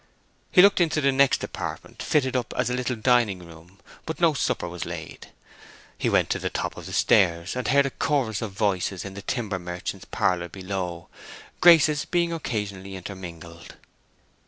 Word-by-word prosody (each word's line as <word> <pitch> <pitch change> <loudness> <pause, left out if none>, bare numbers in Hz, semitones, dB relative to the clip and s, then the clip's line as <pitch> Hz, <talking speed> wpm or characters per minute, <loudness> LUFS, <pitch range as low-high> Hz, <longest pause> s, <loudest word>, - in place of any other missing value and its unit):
He 180 - +7
looked 200 -2 +5
into 160 -2 +2
the 140 -2 +3
next 135 0 +3
apartment, - - -6
fitted 130 -4 +1
up 125 -2 -2
as 125 -1 +1
a - - 0
little 125 0 -1
dining 110 -5 +2
room, 85 +3 -16 0.3
but 160 - -4
no 170 -2 +4
supper 115 -9 -1
was 85 -1 -5
laid. - - -8 0.7
He - - -1
went - - +2
to - - 0
the - - -2
top - - -3
of - - -9
the - - -7
stairs, 85 0 +2
and 125 - -3
heard 140 +2 +4
a 135 - -2
chorus 130 -9 0
of 110 -3 -4
voices 95 -2 -1
in 100 - -7
the 100 - -8
timber 105 -4 -3
merchant's 90 0 -6
parlor 90 -1 0
below, 95 -3 -5 0.5
Grace's 155 -4 +6
being 170 -1 0
occasionally 100 - -4
intermingled. 85 -3 -9
105 Hz, 175 wpm, -25 LUFS, 90-135 Hz, 0.7 s, He